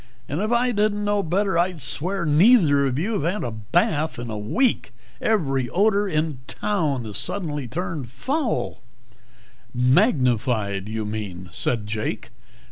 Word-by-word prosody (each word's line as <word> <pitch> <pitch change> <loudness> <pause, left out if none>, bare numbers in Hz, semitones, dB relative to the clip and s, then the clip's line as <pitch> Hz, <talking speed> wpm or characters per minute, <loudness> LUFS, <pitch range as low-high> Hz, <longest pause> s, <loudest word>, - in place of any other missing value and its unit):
And 150 +6 -2
if 215 +2 -1
I 245 +1 +3
didn't 210 -1 +1
know 205 0 +2
better 190 +1 +1
I'd 175 -1 0
swear 170 +8 -1
neither 150 - +5
of 130 -1 -2
you 200 +5 -1
had 170 +5 +1
had 210 - -4
a 120 - -3
bath 145 - 0
in 120 -1 -5
a 110 - -4
week. 170 - 0 0.3
Every 135 - +1
odor 205 +1 +2
in 155 -5 -1
town 160 - -1
has 105 -2 -3
suddenly 150 -9 -2
turned 165 -3 -4
foul 260 - -2 0.5
" 125 +1 -30
"Magnified, 125 - +2
you 110 0 -3
mean," 100 -4 -5
said 115 +2 -1
Jake. 105 +1 -4
150 Hz, 150 wpm, -23 LUFS, 120-200 Hz, 0.5 s, neither